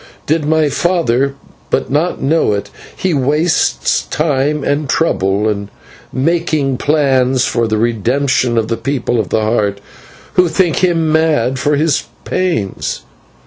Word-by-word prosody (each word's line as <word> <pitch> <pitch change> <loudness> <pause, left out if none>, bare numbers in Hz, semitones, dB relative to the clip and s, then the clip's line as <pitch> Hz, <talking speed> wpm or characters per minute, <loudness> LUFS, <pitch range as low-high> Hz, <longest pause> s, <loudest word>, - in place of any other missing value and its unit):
Did 155 0 0
my 155 0 +2
father 140 -5 +1 0.3
but - - -1
know 150 -4 +1
it, 100 - -4 0.3
he 185 -2 0
wastes 145 - +1
time 150 -1 0
and 145 -1 -1
trouble 100 - +1
in 100 -1 -2 0.4
making 155 -2 0
plans 130 -3 +2
for 115 -1 0
the 110 0 0
redemption 120 +2 +1
of 110 -1 +1
the 115 0 -2
People 120 0 -1
of 105 - -2
the 110 - +1
Heart, 105 -2 0 0.5
who 180 -1 +4
think 165 0 +1
him 165 -4 +1
mad 150 -6 +1
for 145 +2 +1
his 150 -1 +1 0.2
pains. 170 - -2
140 Hz, 135 wpm, -15 LUFS, 115-160 Hz, 0.5 s, who